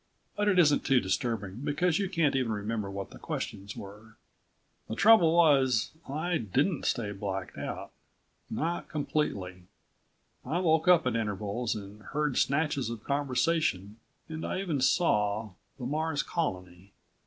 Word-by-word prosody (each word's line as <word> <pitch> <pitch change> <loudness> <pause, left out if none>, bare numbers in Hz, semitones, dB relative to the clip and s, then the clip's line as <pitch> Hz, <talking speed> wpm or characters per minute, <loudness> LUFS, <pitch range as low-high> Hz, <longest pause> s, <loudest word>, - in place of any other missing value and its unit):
But 205 0 0
it 200 -3 +3
isn't 150 -5 +5
too 135 -2 +4
disturbing, 105 -2 -2
because 155 +4 +1
you 195 -2 -1
can't 165 -7 +1
even 130 -4 +1
remember 105 0 -2
what 100 0 -6
the - - -12
questions 100 +1 -5
were. 105 +3 -11 0.7
The 110 - -4
trouble 180 - +6
was... 135 -8 +4 0.2
I 160 +4 -1
didn't 135 - 0
stay 105 -4 0
blacked 95 -2 -4
out. - - -5 0.6
Not 170 +2 -2
completely. 100 - -2 0.8
I 165 - -2
woke 160 -3 +2
up 175 -2 +6
at 125 -2 0
intervals 110 +1 -2
and 105 0 -9
heard 150 +3 -2
snatches 140 -4 +1
of 115 -2 -6
conversation 140 - 0 0.3
and 160 -1 -6
I - - -2
even 160 -8 -1
saw 105 - +2 0.3
the 125 - -6
Mars 155 +2 -1
Colony. 90 - -4
130 Hz, 145 wpm, -29 LUFS, 105-160 Hz, 0.8 s, trouble